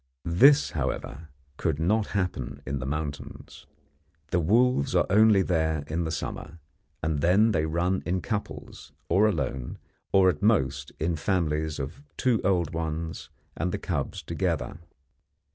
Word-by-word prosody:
This, 140 - +5
however, 75 +1 -4 0.3
could 80 -4 -1
not 100 +7 +1
happen 65 -9 -3
in 70 +1 -3
the 65 - -5
mountains. 75 0 -6 0.6
The 90 - +2
wolves 110 - +2
are - - +4
only 105 -1 +5
there 80 -4 0
in 80 +3 -2
the 80 - -3
summer, 85 +1 -5 0.5
and 80 -2 0
then 100 +8 +4
they 80 -5 +1
run 85 +4 0
in 90 +1 -1
couples, 105 +1 -6 0.2
or 100 +6 +4
alone, 65 - -2 0.3
or 95 -1 +5
at 85 -5 +1
most 70 -10 +1
in 80 +1 0
families 80 -3 -1
of 70 - -6 0.2
two 125 -5 +2
old 90 -4 +1
ones 80 -1 -4 0.3
and 85 +3 -2
the - - -2
cubs 75 -7 -3
together. 75 - -2
85 Hz, 145 wpm, -27 LUFS, 75-95 Hz, 0.6 s, This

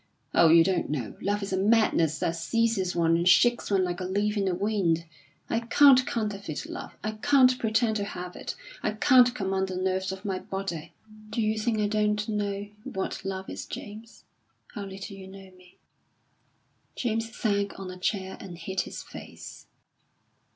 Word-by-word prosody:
Oh, 165 - +6
you 165 +1 +7
don't 185 +1 0
know! 130 -7 -3
Love 205 +1 -1
is 195 - -4
a - - +1
madness 195 -7 +3
that 165 - -1
seizes 200 +1 0
one 165 -1 +3
and 170 +2 +3
shakes 240 +5 +4
one 195 -2 +3
like 180 -1 -2
a - - -3
leaf 205 +3 0
in 200 -2 0
the 185 -2 0
wind. 185 -4 0 0.4
I 225 - 0
can't 255 +2 +6
counterfeit 200 -8 -3
love; - - -8
I 215 - -1
can't 255 +2 +4
pretend 220 0 +1
to 205 - -2
have 180 -3 -6
it. - - -6 0.3
I 215 - -1
can't 250 +2 +5
command 190 -1 -1
the 185 - -5
nerves 190 +1 -1
of 190 +2 -8
my 190 -2 -1
body." 175 -5 -5 0.4
"Do 235 - -3
you 215 -1 +1
think 225 0 0
I 210 -1 +1
don't 210 0 0
know 205 -2 -2 0.2
what 190 0 -4
love 190 0 -4
is, - - -6
James? 220 +2 -9 0.5
How 205 -4 -5
little 195 +1 -8
you 190 -1 -10
know 190 0 -12
me." 180 -1 -20 1.2
James 225 -1 -2
sank 200 -2 -1
on 190 -1 -6
a 180 - -9
chair 190 0 -2
and 180 -3 -9
hid 190 +3 -2
his - - -7
face. - - -11
195 Hz, 180 wpm, -27 LUFS, 185-215 Hz, 1.2 s, you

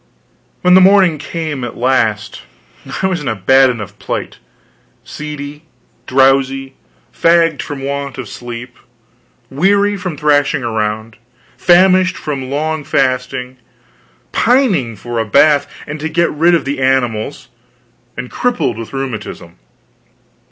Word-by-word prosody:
When 180 0 +5
the 185 - +8
morning 185 -5 +5
came 155 -3 -4
at 120 - -6
last, 110 -5 0 0.6
I - - +3
was 185 -3 0
in 145 - -5
a 110 - 0
bad 130 +7 +4
enough 110 -5 -6
plight: - - -5 0.6
seedy, 150 0 -8 0.4
drowsy, 135 0 +2 0.4
fagged, 165 -3 +3
from 140 -2 -6
want 140 0 -4
of 130 -4 -6
sleep; 120 +3 -8 0.7
weary 200 +8 +2
from 180 -5 -5
thrashing 145 -2 +2
around, 110 -1 -3 0.4
famished 185 +1 +4
from 135 -3 -4
long 155 +2 -2
fasting; 130 -1 -1 0.7
pining 220 - +2
for 120 +3 -5
a - - +1
bath, 145 +6 +4 0.2
and 155 +1 -6
to 160 +2 -3
get 170 +2 +1
rid 170 +3 +3
of 160 - -1
the 140 0 -3
animals; 125 -5 -1 0.7
and 125 +1 -6
crippled 240 - -1
with 115 - -8
rheumatism. 115 - -6
140 Hz, 125 wpm, -15 LUFS, 125-165 Hz, 0.7 s, the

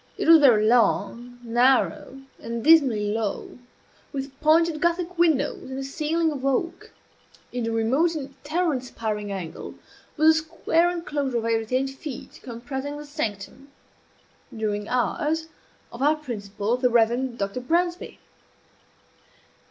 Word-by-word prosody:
It - - -2
was 325 0 +9
very 235 -7 +5
long, 235 +1 +1
narrow, 255 +2 +1 0.2
and 230 0 -5
dismally 260 -11 +4
low, 220 +2 -4 0.5
with 275 -1 -5
pointed 315 0 +3
Gothic 345 0 -1
windows 320 -6 +1
and 265 - -5
a 270 - -4
ceiling 315 +3 -1
of 275 -3 -6
oak. 275 +5 -2 0.6
In 245 -2 -3
a - - -1
remote 260 +10 +1
and 275 -2 -6
terror 325 +2 0
inspiring 220 -5 -4
angle 185 -5 -6 0.4
was 310 +1 +4
a 320 0 +5
square 330 +1 +1
enclosure 295 -7 -2
of 225 - -2
eight 225 -1 +1
or - - -7
ten 255 +4 0
feet, 270 0 -9
comprising 265 +4 -6
the 295 - -8
sanctum, 270 -3 -5 0.8
"during 210 -2 -3
hours," 310 +6 -1 0.4
of 235 - -9
our 295 +3 +4
principal, 215 -5 -3
the 250 0 +2
Reverend 240 +2 +1
Dr. 200 +3 -3
Bransby. 345 +6 -1
265 Hz, 135 wpm, -24 LUFS, 230-310 Hz, 0.8 s, was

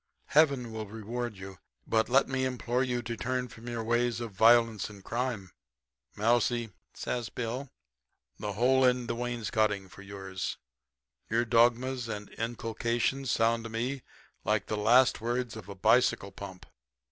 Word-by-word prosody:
Heaven 140 -6 +3
will 110 -1 -5
reward 115 +1 -5
you. 95 -1 -9 0.3
But 110 +1 +1
let 135 +3 +4
me 130 0 -1
implore 125 -1 -1
you 125 -2 -1
to 115 0 -4
turn 125 +2 -2
from 115 +1 -12
your 120 -1 -3
ways 120 0 +1
of 120 -2 -5
violence 115 0 +4
and 100 -2 -13
crime.' 115 -6 -3 0.6
"'Mousie,' 115 +1 +1 0.2
says 120 -2 -3
Bill, 125 +3 -4 0.7
'the 105 -1 -3
hole 130 +5 +3
in 125 -1 +3
the - - -2
wainscoting 110 -4 -1
for 100 - -13
yours. 95 -2 -5 0.7
Your 115 +2 +2
dogmas 120 +2 +3
and 105 -2 -5
inculcations 120 +3 -1
sound 115 -1 +2
to - - -5
me 125 +4 -2 0.4
like 105 +1 +1
the 110 - -2
last 115 +3 +4
words 120 0 -2
of 105 -3 -9
a 100 - -7
bicycle 110 -1 +3
pump. 95 -2 -9
115 Hz, 150 wpm, -30 LUFS, 110-125 Hz, 0.7 s, let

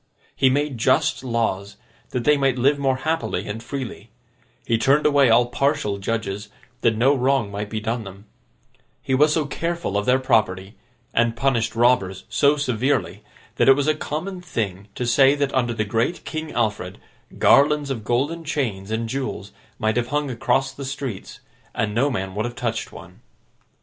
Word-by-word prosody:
He 130 - +4
made 140 -2 -1
just 130 +2 +2
laws, 115 -5 -2 0.3
that 125 -2 -3
they 150 +3 +5
might 135 -2 +1
live 140 +3 +2
more 135 -2 +1
happily 160 +5 -2
and 110 +2 -5
freely; 120 -4 -6 0.6
he 115 -1 +1
turned 140 +5 +3
away 140 -3 +5
all 120 +2 +5
partial 140 -5 -1
judges, 105 -1 -3 0.3
that 115 -2 +2
no 135 +5 +4
wrong 130 -5 +1
might 100 +1 -4
be 110 - -3
done 115 +2 -2
them; 100 +1 -11 0.8
he 130 - -2
was 150 +3 +4
so 155 -1 +1
careful 170 - -3
of 105 - -5
their 125 +1 +5
property, 100 -6 0 0.4
and 115 0 +2
punished 120 -3 0
robbers 110 -6 +2
so 145 +1 +3
severely, 130 -1 -1 0.3
that - - +4
it - - +10
was 145 +1 -1
a 155 - +4
common 170 +5 -5
thing 105 - -4
to 125 - -2
say 135 +4 +5
that 140 -1 -1
under 125 -2 +1
the 110 -2 -1
great 115 - -1
King 155 -1 -5
Alfred, 105 -5 -2 0.4
garlands 145 0 +4
of 115 -5 -4
golden 140 +9 -1
chains 120 -11 -3
and 110 +1 -2
jewels 130 -5 -4 0.3
might 110 +1 0
have 120 -1 0
hung 145 +1 -1
across 135 +3 0
the 140 +1 -9
streets, 135 -6 -6 0.3
and 105 -1 -1
no 130 +6 +2
man 95 -7 -3
would 105 +3 -2
have 120 0 -5
touched 115 -2 -3
one. - - -13
125 Hz, 175 wpm, -22 LUFS, 110-140 Hz, 0.8 s, it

